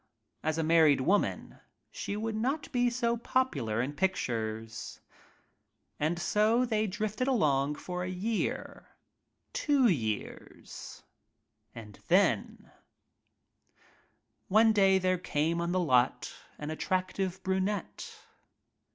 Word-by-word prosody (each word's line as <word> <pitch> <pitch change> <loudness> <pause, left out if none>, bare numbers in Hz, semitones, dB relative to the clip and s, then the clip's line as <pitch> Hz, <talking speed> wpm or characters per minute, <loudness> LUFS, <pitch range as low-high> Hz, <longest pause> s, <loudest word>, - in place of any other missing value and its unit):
As 155 0 -1
a 160 - 0
married 155 -4 +5
woman 195 +10 0 0.3
she 205 - -4
would 220 +1 -2
not 265 +8 -2
be 245 -1 +2
so 235 -1 0
popular 140 - 0
in 140 +3 -4
pictures. 115 - -3 1.0
And 155 +3 0
so 215 +8 +2
they 220 -2 0
drifted 215 +5 -2
along 150 - +2
for 180 +2 -5
a 180 - -3
year 205 +5 -3 0.3
— - - -51
two 280 -4 +3
years 110 - -4 0.3
— - - -45
and 105 -3 -11
then - - +1 0.8
— - - -35 0.3
One 220 +2 +5
day 195 -2 +5
there 185 -1 +1
came 165 0 -1
on 170 0 -1
the 185 - +1
"lot" 130 -7 +2 0.2
an 150 +1 -5
attractive 185 +2 -2
brunette. 190 +2 -3
185 Hz, 115 wpm, -30 LUFS, 150-215 Hz, 1.0 s, married